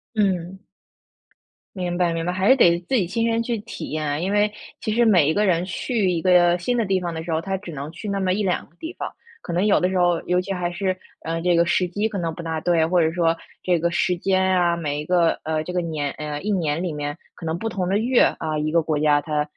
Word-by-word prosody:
嗯。 190 -3 0 1.2
明 175 -1 -2
白 175 -2 +2
明 165 0 -2
白， 180 - 0
还 185 +2 0
是 260 - +8
得 175 -9 +4
自 265 - +1
己 200 - +2
亲 230 +6 -1
身 230 0 +1
去 235 -1 -2
体 215 +3 -7
验 155 0 -2
啊， 145 0 -1
因 185 +5 -2
为 210 0 +3 0.3
其 215 - -2
实 240 +1 +3
每 185 -10 +5
一 155 - +2
个 210 +3 +2
人 175 -1 +2
去 205 0 -1
一 170 -2 0
个 175 -1 +4
新 245 +8 -1
的 230 - +1
地 190 -1 +1
方 175 -1 -3
的 160 - -4
时 165 0 -3
候， 160 - 0
他 190 +2 -2
只 190 -2 -10
能 145 +2 -6
去 190 +6 -8
那 200 0 -1
么 185 -1 +1
1、2 195 -2 -1
个 - - -31
地 325 +3 -6
方， - - -4 0.3
可 - - -6
能 180 +4 +1
有 210 - +4
的 180 - +2
时 190 - -1
候， 175 -2 +2
尤 180 0 +1
其 195 +2 -3
还 175 -1 -2
是， 185 +1 -1 0.3
呃， 165 +1 -2
这 175 +1 +2
个 170 - +4
时 180 - +2
机 205 +5 -1
可 205 - -5
能 165 -2 -2
不 170 - -7
大 160 -1 -3
对， 165 -1 +2
或 175 0 +3
者 160 - +2
说， 165 -1 +1 0.3
这 180 -1 +2
个 170 +1 0
时 180 +1 +1
间 190 +2 +1 0.2
啊， 175 -1 +2
每 150 -3 -2
一 - - -7
个 175 -1 +3
呃， 155 0 -1
这 180 - -5
个 180 - +1
年 155 -4 -3
呃， 150 -1 -5
一 210 - -3
年 165 -5 0
里 175 -4 -2
面， 145 +1 -4 0.2
可 165 - -9
能 160 +1 -1
不 225 - -3
同 185 -5 -2
的 195 - +2
月， 240 +3 +3 0.2
啊， 155 -1 -2
一 155 0 -1
个 170 0 +3
国 155 -1 -1
家， 150 -1 +3
它 150 0 -1
175 Hz, 290 characters per minute, -23 LUFS, 165-195 Hz, 1.2 s, 是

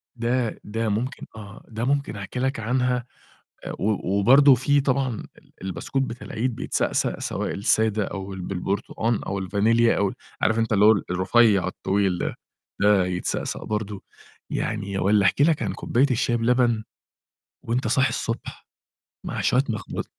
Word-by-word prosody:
ده 120 -1 -1
ده 110 +1 -2
ممكن 120 +7 -3
آه، 105 -1 -11
ده 115 +1 -4
ممكن 140 -3 0
أحكي 100 +4 -6
لك 130 -1 -1
عنها 125 +2 0 0.6
آآ، - - -4
و 100 -1 0
وبرضه 135 +6 +7
في 140 +3 +2
طبعًا 130 -4 -1
ال - - -22
البسكوت 95 +8 -3
بتاع 120 -2 -5
العيد 120 +2 -2
بيتسقسق - - -1
سواء - - -3
السادة 110 +1 +1
أو 95 0 -6
ال 95 - -6
بالبرتقان 100 +5 -2
أو 100 0 -3
الفانيليا 110 +5 +2
أو 100 -1 +2
ال - - -7 0.3
عارف 110 +1 +2
أنت 115 0 0
اللي 105 0 +5
هو 110 - +8
ال 105 - +1
الرفيّع 100 +2 +3
الطويل 95 -2 0
ده، - - -3 0.5
ده 100 -2 +4
يتسقسق 90 0 -3
برضه، 105 -2 -4 0.5
يعني 100 -2 -2
والّا 100 +1 +3
أحكي 140 - +3
لك 160 -2 +2
عن - - -1
كوباية 130 +4 +1
الشاي 120 -1 +1
بلبن 120 -1 +2 0.8
وأنت 115 0 -1
صاحي 130 +3 +3
الصبح - - -5 0.6
مع - - -4
شوية 130 +2 +2
مخبوز 110 -3 -4
110 Hz, 160 wpm, -24 LUFS, 100-125 Hz, 0.8 s, هو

